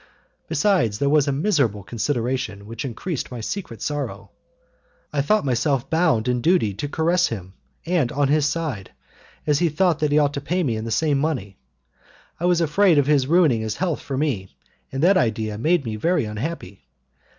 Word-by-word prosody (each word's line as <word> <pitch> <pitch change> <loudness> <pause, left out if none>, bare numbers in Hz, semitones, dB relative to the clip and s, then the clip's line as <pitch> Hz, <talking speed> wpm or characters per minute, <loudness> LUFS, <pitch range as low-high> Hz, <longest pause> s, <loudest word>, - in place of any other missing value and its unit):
Besides, 130 - +2
there 140 +4 +1
was 150 -1 +3
a - - +2
miserable 140 - +1
consideration 120 -1 -2
which 115 +5 -6
increased 135 - -4
my 125 - -7
secret 115 - -5
sorrow. 145 -1 -4 0.8
I 145 - +1
thought 210 +8 +2
myself 135 +1 0
bound 160 -9 +2
in 125 -1 0
duty 165 - +2
to 125 +9 -5
caress 170 +4 +2
him, 95 -5 -7 0.3
and 165 -8 +1
on 145 0 +1
his 150 +1 +2
side, 145 - -4 0.5
as 150 -2 +2
he 170 -1 +2
thought 165 +1 +1
that 150 -1 0
he 145 - +3
ought 145 -1 +3
to 140 - -4
pay 180 +6 -1
me 120 -7 0
in 110 +1 -4
the - - -4
same 145 +3 +1
money, 125 -11 -3 0.8
I 175 - -1
was 175 -1 +3
afraid 170 +2 +3
of 145 - +4
his 140 -2 +2
ruining 155 -8 +3
his 110 -1 -3
health 175 -5 -2
for 135 - -4
me, 130 -11 -1 0.4
and 135 +2 -2
that 190 +2 +5
idea 110 - -1
made 160 +2 +2
me 110 -1 -3
very 170 +3 +1
unhappy. 105 - -6
140 Hz, 185 wpm, -22 LUFS, 115-160 Hz, 0.8 s, that